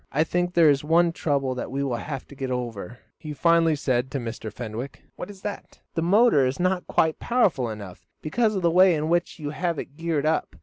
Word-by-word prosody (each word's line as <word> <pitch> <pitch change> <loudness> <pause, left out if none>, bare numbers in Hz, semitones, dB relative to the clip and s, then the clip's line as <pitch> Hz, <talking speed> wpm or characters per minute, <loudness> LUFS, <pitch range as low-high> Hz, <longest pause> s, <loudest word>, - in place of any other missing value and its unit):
"I 150 +3 +2
think 175 +2 -1
there 165 -3 +6
is 140 0 0
one 170 +2 +3
trouble 140 -5 -1
that 125 - -5
we 140 +2 -2
will 130 -4 -1
have 135 +1 -6
to - - -11
get 135 -1 -5
over," 120 -3 -4 0.2
he 155 -1 -7
finally 165 +1 +3
said 130 -3 -1
to 140 - -3
Mr. 115 -2 -6
Fenwick. 120 +3 -7
"What - - -7
is 195 -2 -12
that?" 205 - -7
"The 165 - -1
motor 195 - +4
is 130 - -3
not 185 0 0
quite 160 -1 +1
powerful 175 - +1
enough 100 -4 -9
because 215 +7 0
of 190 - -2
the 170 - +3
way 185 0 +5
in 155 +1 -2
which 175 +1 0
you 145 -3 -5
have 170 +1 -2
it 145 +1 -7
geared 165 -3 -1
up. 160 +1 0
150 Hz, 225 wpm, -25 LUFS, 130-175 Hz, 0.2 s, there